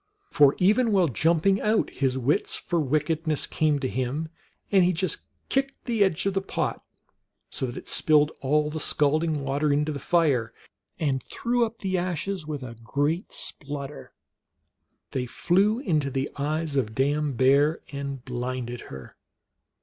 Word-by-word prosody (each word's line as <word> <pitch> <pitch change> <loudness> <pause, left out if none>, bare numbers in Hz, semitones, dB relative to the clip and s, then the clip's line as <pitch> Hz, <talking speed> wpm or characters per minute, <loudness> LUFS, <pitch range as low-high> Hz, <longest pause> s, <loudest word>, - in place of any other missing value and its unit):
For 145 -1 +5
even 215 +5 +3
while 190 -4 +4
jumping 170 - +2
out 215 +1 +1
his 130 -2 0
wits 130 +4 +1
for 175 - -1
wickedness 155 +2 0
came 155 -2 +1
to 130 - 0
him, 130 +8 -2 0.4
and 195 -2 +5
he 180 +1 +3
just 180 +3 -1 0.3
kicked 270 0 -1
the 230 -4 +2
edge 185 -2 0
of 195 - +1
the 195 - 0
pot, - - -3 0.7
so 130 - -1
that 120 - -7
it - - -9
spilled 150 -1 +4
all 150 +2 +1
the 160 - -4
scalding 155 +2 +1
hot 145 - -3
water 140 +2 0
into 150 +2 +1
the 145 - -4
fire, 140 -11 +1 0.4
and 135 -4 0
threw 235 - 0
up 225 0 -14
the 190 -2 0
ashes 180 -1 -3
with 145 -3 -4
a 120 -2 -7
great 145 - -1
splutter. 145 -1 -4 1.0
They 125 -1 -2
flew 200 - +2
into 155 - 0
the 135 +1 -2
eyes 150 +1 -2
of 110 -5 0
Dame 145 +1 +1
Beav 140 +5 +4 0.2
and 140 -2 -5
blinded 125 -1 -4
her. 65 -1 -10
150 Hz, 160 wpm, -26 LUFS, 135-175 Hz, 1.0 s, For